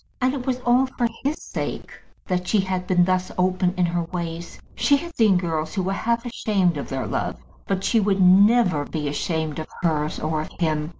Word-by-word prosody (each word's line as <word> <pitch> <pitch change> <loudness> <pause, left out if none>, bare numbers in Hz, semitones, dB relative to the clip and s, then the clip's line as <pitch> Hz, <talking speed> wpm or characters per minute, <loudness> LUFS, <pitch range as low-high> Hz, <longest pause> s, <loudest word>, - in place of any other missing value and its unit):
And 255 +1 +1
it 270 -2 -5
was 255 -1 0
all 250 +2 +3
for 245 -2 -1 0.2
his 285 +3 -1
sake - - -5 0.3
that 180 -1 -2
she 210 0 +3
had 185 -1 -3
been 180 -1 +4
thus 185 0 0
open 185 0 +1
in 180 - +3
her 175 0 -1
ways. 170 -1 -6
She 285 - +3
had 340 +3 -8
seen 215 -5 +4
girls 160 -2 -2
who 190 - 0
were 190 +2 -1
half 235 +4 -1
ashamed 200 -7 0
of 140 - -5
their 135 -1 -3
love; - - -2 0.3
but 195 -1 -1
she 230 - +3
would 200 -1 +1
never 190 -2 +5
be 150 0 -4
ashamed 160 +1 -2
of 155 - -5 0.2
hers 155 -2 0
or 155 0 -1
of 155 - -7
him. 155 -2 0
185 Hz, 205 wpm, -23 LUFS, 165-220 Hz, 0.3 s, never